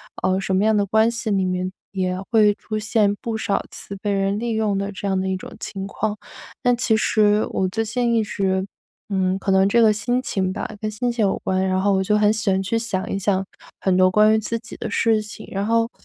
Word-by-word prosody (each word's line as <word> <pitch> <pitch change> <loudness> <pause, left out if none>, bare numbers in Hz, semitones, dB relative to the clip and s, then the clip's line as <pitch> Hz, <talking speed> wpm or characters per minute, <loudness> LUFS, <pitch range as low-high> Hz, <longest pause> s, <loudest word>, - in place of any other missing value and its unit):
啊， 185 +1 0
什 190 -1 -1
么 195 - +2
样 220 0 +3
的 200 - +2
关 220 +3 +3
系 230 -1 -4
里 195 -2 +1
面 185 0 -2 0.2
也 185 -1 -1
会 210 -2 +5
出 215 -1 -5
现 210 -1 +2
不 225 -1 -3
少 205 -2 -1
次 200 - -9
被 205 +1 -2
人 195 +1 0
利 235 0 -2
用 215 -2 0
的 200 +1 -2
这 200 +1 -5
样 190 -1 +1
的 190 - -2
一 190 - 0
种 - - -10
情 195 -1 -5
况。 210 +1 -3 0.5
但 245 0 +4
其 230 -2 +2
实 210 -1 +3
我 190 - 0
最 220 +4 -1
近 235 +2 0
一 225 - +3
直 190 -2 -1 0.4
嗯， 190 -1 +1
可 195 - -1
能 190 0 +4
这 235 +3 +3
个 220 -1 +6
心 245 +4 0
情 190 -7 -1
吧， - - -4
跟 215 - -2
心 240 +3 -1
情 235 -3 +1
有 195 - +1
关， 190 0 0
然 185 0 +1
后 200 0 +2
我 190 0 +2
就 210 +2 +2
很 210 0 +4
喜 215 -2 -1
欢 190 0 +1
去 205 +4 -1
想 215 -5 -3
一 195 - -1
想 195 -1 0 0.4
很 185 -1 +1
多 185 0 +5
关 215 +2 +5
于 220 - +4
自 230 +2 -3
己 225 - -11
的 - - -4
事 225 -2 +2
情。 210 0 -10
然 195 +1 -2
后， 230 +1 +2
205 Hz, 265 characters per minute, -22 LUFS, 190-220 Hz, 0.5 s, 个